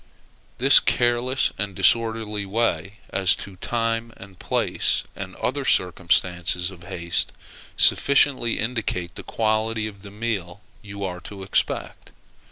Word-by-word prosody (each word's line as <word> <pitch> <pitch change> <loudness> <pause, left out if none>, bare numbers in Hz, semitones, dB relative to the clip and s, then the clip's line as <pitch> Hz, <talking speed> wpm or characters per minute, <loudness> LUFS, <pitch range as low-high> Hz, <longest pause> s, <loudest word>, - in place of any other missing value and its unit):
This - - +8
careless 120 +2 +1
and 100 -2 -3
disorderly 110 -1 +2
way 105 -1 -1
as 95 -1 +3
to 100 - -9
time 115 +1 -2
and 95 -2 -14
place, - - 0
and 95 -1 -7
other 140 +2 -2
circumstances 90 -2 +1
of 90 -2 -14
haste, 85 -2 -1 0.5
sufficiently 135 -4 +4
indicate 110 -7 -2
the - - -8
quality 110 0 -1
of 100 -2 -8
the 100 - -10
meal 100 -4 -4 0.2
you 100 -1 -8
are 90 -2 -4
to 100 +2 -9
expect. 95 - -1
105 Hz, 125 wpm, -23 LUFS, 95-115 Hz, 0.5 s, This